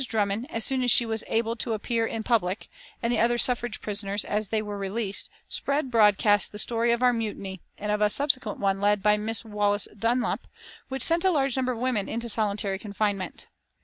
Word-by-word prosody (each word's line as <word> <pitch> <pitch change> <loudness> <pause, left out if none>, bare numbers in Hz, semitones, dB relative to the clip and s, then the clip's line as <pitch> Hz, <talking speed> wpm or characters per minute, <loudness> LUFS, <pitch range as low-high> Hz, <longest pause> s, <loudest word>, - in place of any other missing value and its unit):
Drummond, 210 +2 -1
as 225 -5 0
soon 265 -1 +1
as 250 - +1
she 240 0 +6
was 225 -1 -1
able 230 0 0
to 230 +1 -2
appear 225 +1 -1
in 225 0 -4
public, 205 -5 0 0.3
and 235 +1 +1
the 235 - +1
other 240 +1 +3
suffrage 240 -2 +1
prisoners, 205 -1 -1
as 210 0 -2
they 220 - +1
were 205 -1 -5
released, 200 +1 -3 0.2
spread 280 -2 -2
broadcast 210 -2 +4
the 210 - -8
story 230 +2 +1
of 235 +1 +1
our 250 0 +5
mutiny, 200 -5 -4 0.2
and 210 0 -3
of 210 0 0
a 210 - +4
subsequent 255 -4 0
one 195 -1 0
led 205 -1 +2
by 210 0 +5
Miss 225 +2 0
Wallace 205 -1 +1
Dunlop, 235 +3 -1 0.4
which 265 0 -1
sent 335 0 +3
a 380 - +4
large 275 -7 +1
number 255 -1 0
of - - -7
women 240 -4 0
into 235 +1 -3
solitary 205 -2 -1
confinement. 200 -3 -3
220 Hz, 205 wpm, -26 LUFS, 205-240 Hz, 0.4 s, she